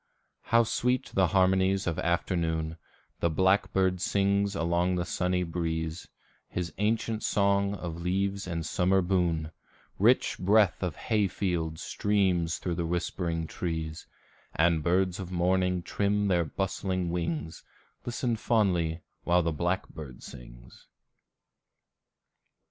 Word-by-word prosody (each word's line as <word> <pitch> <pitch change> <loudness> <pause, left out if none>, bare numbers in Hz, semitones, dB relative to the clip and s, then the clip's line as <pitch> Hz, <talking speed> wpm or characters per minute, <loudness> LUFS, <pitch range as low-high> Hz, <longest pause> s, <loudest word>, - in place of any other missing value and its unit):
How 115 0 +4
sweet 125 +3 0
the 95 -2 +3
harmonies 95 +1 +2
of 85 0 -1
afternoon, 80 -2 -1 0.4
The 85 - +2
blackbird 95 +1 +2
sings 100 +1 +1
along 85 +1 +1
the 90 -1 -1
sunny 90 +1 0
breeze 80 -1 -3 0.4
His 85 -3 -4
ancient 110 +1 0
song 100 0 +2
of 85 -3 -6
leaves 95 +2 -1
and 85 -2 -3
summer 95 +3 +2
boon; 85 -4 0 0.5
Rich - - +3
breath 100 0 +3
of 90 -5 -2
hayfields 90 -6 -1
streams 95 -5 +1
thro' 90 - -3
the 85 0 -2
whispering 85 -1 -2
trees, 80 -1 -4 0.5
And 80 0 +3
birds 90 +3 +1
of 90 -2 -6
morning 90 0 +1
trim 100 +1 0
their 85 -3 +2
bustling 95 +1 -2
wings, 85 -2 -3 0.4
And - - -26
listen 120 0 -1
fondly, 90 -8 +1 0.2
while 90 0 +3
the 85 -1 0
blackbird 80 -5 -3
sings. - - -13
90 Hz, 120 wpm, -28 LUFS, 85-95 Hz, 0.5 s, How